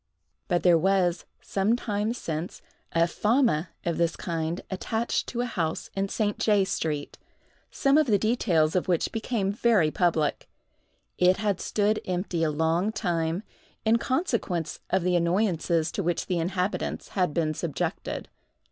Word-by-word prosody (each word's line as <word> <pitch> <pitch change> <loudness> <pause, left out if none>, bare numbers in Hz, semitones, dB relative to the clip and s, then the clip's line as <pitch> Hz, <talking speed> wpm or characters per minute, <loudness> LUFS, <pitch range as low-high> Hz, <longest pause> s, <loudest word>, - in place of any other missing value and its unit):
But 175 -2 +1
there 175 -2 +6
was, 185 -1 +2 0.2
some 200 +4 +1
time 210 -2 -1
since, 165 -5 -5 0.3
a 165 0 +3
fama 210 - +1 0.2
of 170 -1 -1
this 170 0 +1
kind 165 0 -3
attached 220 +4 -1
to 240 - -2
a - - 0
house 165 -9 -3
in 195 0 -1
St. 210 -1 -1
J—— 205 -3 +3
street, 155 -5 -3 0.5
some 275 +1 +3
of 305 - +2
the 210 -3 +4
details 185 -8 +2
of 185 - +1
which 175 -3 +1
became 220 -3 -1
very 205 -7 +3
public. 165 -4 0 0.7
It 180 +1 +5
had 205 -3 -1
stood 210 +1 +1
empty 180 -2 -1
a 160 - +2
long 160 +6 +1
time, 175 -3 -1 0.4
in 220 +1 +5
consequence 235 - -1
of 190 -2 +1
the 180 0 +2
annoyances 170 -2 +1
to - - -2
which 175 -1 -1
the 180 -2 -1
inhabitants 180 +3 -2
had 180 -5 0
been 155 0 0
subjected. 155 -1 -3
180 Hz, 150 wpm, -27 LUFS, 165-210 Hz, 0.7 s, there